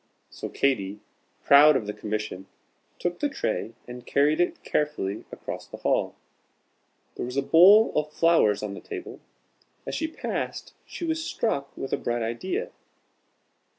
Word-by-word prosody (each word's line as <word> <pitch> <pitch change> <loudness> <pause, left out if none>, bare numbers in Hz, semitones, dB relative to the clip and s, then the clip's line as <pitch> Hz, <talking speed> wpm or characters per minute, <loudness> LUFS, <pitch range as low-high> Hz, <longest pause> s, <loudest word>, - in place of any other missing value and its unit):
So - - -6
Katy, 105 -7 0 0.4
proud 145 +2 +7
of 110 - 0
the 105 - -4
commission, 105 -3 -4 0.5
took 175 0 -3
the 290 - 0
tray 115 - -3
and 125 0 -9
carried 145 +5 +2
it 175 - -1
carefully 130 -10 -2
across - - -7
the - - -9
hall. - - 0 1.0
There - - -3
was 125 +2 -5
a 140 - +2
bowl 195 +9 +7
of 150 0 0
flowers 155 -13 +3
on 105 -2 -4
the 100 - -8
table. - - -8 0.7
As - - -5
she 320 - -1
passed, 320 - -5
she 340 - -6
was 320 -1 -1
struck 140 - -2
with 135 - -5
a - - +2
bright 120 -1 -2
idea. 190 - -3
140 Hz, 150 wpm, -26 LUFS, 110-175 Hz, 1.0 s, proud